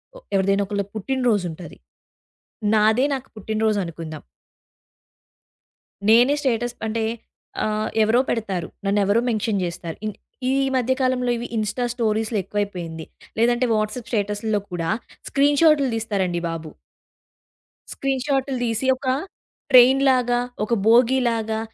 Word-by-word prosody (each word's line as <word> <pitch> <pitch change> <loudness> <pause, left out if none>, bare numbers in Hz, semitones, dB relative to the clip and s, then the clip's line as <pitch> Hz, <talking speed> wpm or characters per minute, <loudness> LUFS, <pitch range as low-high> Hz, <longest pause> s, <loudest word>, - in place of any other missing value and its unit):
ఒ - - -10 0.2
ఎవరిదైనా 195 +1 +2
ఒకళ్ళ 200 -1 -1
పుట్టిన 260 +6 -2
రోజు 205 -5 +1
ఉంటది. 165 0 -10 1.0
నాదే 220 +5 +4
నాకు 265 0 -7
పుట్టిన 215 +1 -4
రోజు 215 -2 +2
అనుకుందాం. 160 -2 -7 1.9
నేనే 240 +5 +6
స్టేటస్ 240 -2 -1
అంటే 225 0 -1 0.6
ఆహ్, 215 0 -1
ఎవరో 225 +3 +3
పెడతారు. 195 -7 -2 0.2
నన్నెవరో 205 +3 +2
మెన్షన్ 215 -3 0
జేస్తారు. 170 -1 -5
ఇన్ 215 - -2 0.4
ఈ - - +2 0.2
మధ్య 260 0 +2
కాలంలో 250 -1 +1
ఇవి 235 - -5
ఇన్స్‌టా 215 +3 -1
స్టోరీస్‌లో 220 -1 0
ఎక్కువైపోయింది. 175 -6 -4 0.3
లేదంటే 240 +2 +3
వాట్సాప్ 215 +2 -2
స్టేటస్‌లో 210 0 0
కూడా 165 -2 -2 0.4
స్క్రీన్‌షాటులు 285 0 +4
దీస్తారండి 195 -6 -1
బాబు! 165 -1 -5 1.2
స్క్రీన్‌షాటులు 270 0 -1
దీసి 230 +2 -1
ఒక 260 0 -7 0.6
ట్రైన్‌లాగా 255 -1 +5 0.2
ఒక 225 +3 -1
బోగీలాగా 230 -2 +3
220 Hz, 115 wpm, -22 LUFS, 205-250 Hz, 1.9 s, నేనే